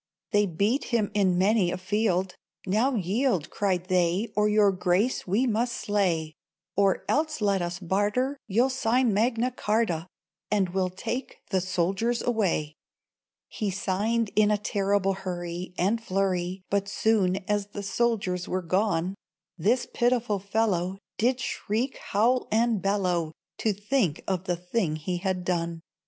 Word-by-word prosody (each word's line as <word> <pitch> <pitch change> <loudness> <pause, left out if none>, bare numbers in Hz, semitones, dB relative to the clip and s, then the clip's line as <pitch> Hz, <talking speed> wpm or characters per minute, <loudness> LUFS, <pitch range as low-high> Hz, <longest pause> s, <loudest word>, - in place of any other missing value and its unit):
They 205 0 +3
beat 200 - 0
him 225 -4 0
in 190 -4 +2
many 195 0 +3
a - - -2
field; 190 -1 0 0.3
"Now 225 +8 +2
yield!" 200 - 0
Cried 185 -3 0
they, 185 +4 +1
"or 210 0 +3
Your 210 -1 +4
Grace 185 +6 0
we 210 +8 +2
must 235 +1 0
slay! 175 -7 0 0.4
Or 195 -1 +2
else, 310 +1 0
let 200 -3 +2
us 175 0 -3
barter! 205 +9 0
You'll 235 +6 +2
sign 245 -2 +2
Magna 230 +4 +1
Charta, 210 -8 0 0.4
And 200 -3 +1
we'll 185 0 0
take 235 +8 -5
the 190 -2 +2
soldiers 190 +6 0
away." 190 -10 0 0.7
He 210 - -3
signed 205 +4 0
in 210 -1 +5
a 210 - +3
terrible 200 -1 +1
hurry, 180 -1 -5
And 210 +6 +1
flurry; 185 -2 -1
But 200 0 +1
soon 200 -3 +2
as 205 -1 0
the 205 0 -7
soldiers 195 -3 0
were 185 0 -2
gone, 185 0 +1 0.4
This 220 +9 +1
pitiful 240 -4 +1
fellow 195 -2 0 0.2
Did 245 +3 +2
shriek, 235 +2 -2
howl 240 +5 +1
and 225 -2 +2
bellow, 180 -5 0 0.3
To 220 - +2
think 205 - 0
of 190 -1 -1
the 180 - 0
thing 180 -2 -1
he 175 +4 -3
had 185 -1 -2
done. 170 -2 -1
200 Hz, 145 wpm, -27 LUFS, 185-225 Hz, 0.7 s, in